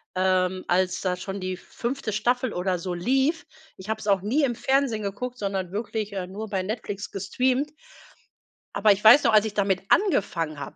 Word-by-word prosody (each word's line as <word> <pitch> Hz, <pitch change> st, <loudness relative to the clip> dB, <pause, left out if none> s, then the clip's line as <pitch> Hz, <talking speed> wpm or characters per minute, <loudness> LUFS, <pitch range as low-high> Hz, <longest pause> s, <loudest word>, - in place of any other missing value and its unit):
ähm, 185 Hz, 0 st, +1 dB
als 185 Hz, +1 st, +1 dB
da 185 Hz, -1 st, 0 dB
schon 195 Hz, +2 st, -6 dB
die 185 Hz, 0 st, -4 dB
5. 240 Hz, +1 st, -4 dB
Staffel 245 Hz, +3 st, 0 dB
oder 180 Hz, 0 st, -1 dB
so 180 Hz, +1 st, -4 dB
lief. 265 Hz, -, +1 dB, 0.3 s
Ich 190 Hz, +3 st, -11 dB
habe 220 Hz, 0 st, -1 dB
es 215 Hz, -, -8 dB
auch 195 Hz, -2 st, +3 dB
nie 255 Hz, +10 st, +1 dB
im 245 Hz, -4 st, +1 dB
Fernsehen 265 Hz, -4 st, +1 dB
geguckt, 245 Hz, +6 st, -4 dB
sondern 195 Hz, -4 st, -3 dB
wirklich, 215 Hz, 0 st, -3 dB
äh, 190 Hz, -2 st, -3 dB
nur 210 Hz, +4 st, -6 dB
bei 190 Hz, -2 st, -1 dB
Netflix 205 Hz, -1 st, -5 dB
gestreamt. 255 Hz, +9 st, 0 dB, 1.0 s
Aber 215 Hz, -, +4 dB
ich 200 Hz, +1 st, +1 dB
weiß 240 Hz, +7 st, +8 dB
noch, -, -, +3 dB
als 215 Hz, 0 st, +6 dB
ich 215 Hz, -, -4 dB
damit 195 Hz, -2 st, 0 dB
angefangen 165 Hz, -, +1 dB
habe 140 Hz, -, -7 dB
205 Hz, 190 wpm, -25 LUFS, 185-240 Hz, 1.0 s, weiß